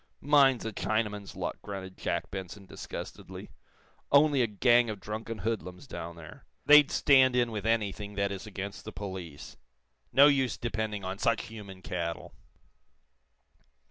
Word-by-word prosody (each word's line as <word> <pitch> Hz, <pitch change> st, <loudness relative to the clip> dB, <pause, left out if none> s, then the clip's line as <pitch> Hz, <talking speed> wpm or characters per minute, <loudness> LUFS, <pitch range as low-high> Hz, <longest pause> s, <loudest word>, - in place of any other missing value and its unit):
"Mine's 140 Hz, -4 st, +4 dB
a 110 Hz, -, -4 dB
Chinaman's 105 Hz, 0 st, -2 dB
luck," -, -, -4 dB
grunted 95 Hz, -2 st, -7 dB
Jack -, -, -3 dB
Benson, 95 Hz, +1 st, -7 dB
disgustedly. -, -, -8 dB, 0.6 s
"Only 145 Hz, -1 st, +5 dB
a 120 Hz, -, +2 dB
gang 120 Hz, +3 st, +3 dB
of 105 Hz, -2 st, -5 dB
drunken 110 Hz, +3 st, -5 dB
hoodlums 105 Hz, 0 st, -4 dB
down 85 Hz, -9 st, -7 dB
there. 85 Hz, -2 st, -13 dB, 0.2 s
They'd 150 Hz, 0 st, +8 dB
stand 130 Hz, -3 st, +4 dB
in 120 Hz, -2 st, +2 dB
with 105 Hz, -1 st, -4 dB
anything 105 Hz, -2 st, -1 dB
that 100 Hz, 0 st, 0 dB
is 100 Hz, +2 st, -6 dB
against 100 Hz, -1 st, -6 dB
the -, -, -7 dB
police. 95 Hz, -6 st, -8 dB, 0.5 s
No 135 Hz, +3 st, +7 dB
use 135 Hz, -3 st, +3 dB
depending 110 Hz, -3 st, -3 dB
on 95 Hz, +1 st, -4 dB
such 115 Hz, -1 st, +1 dB
human 100 Hz, -4 st, -10 dB
cattle." 85 Hz, -2 st, -4 dB
105 Hz, 140 wpm, -29 LUFS, 95-120 Hz, 0.6 s, They'd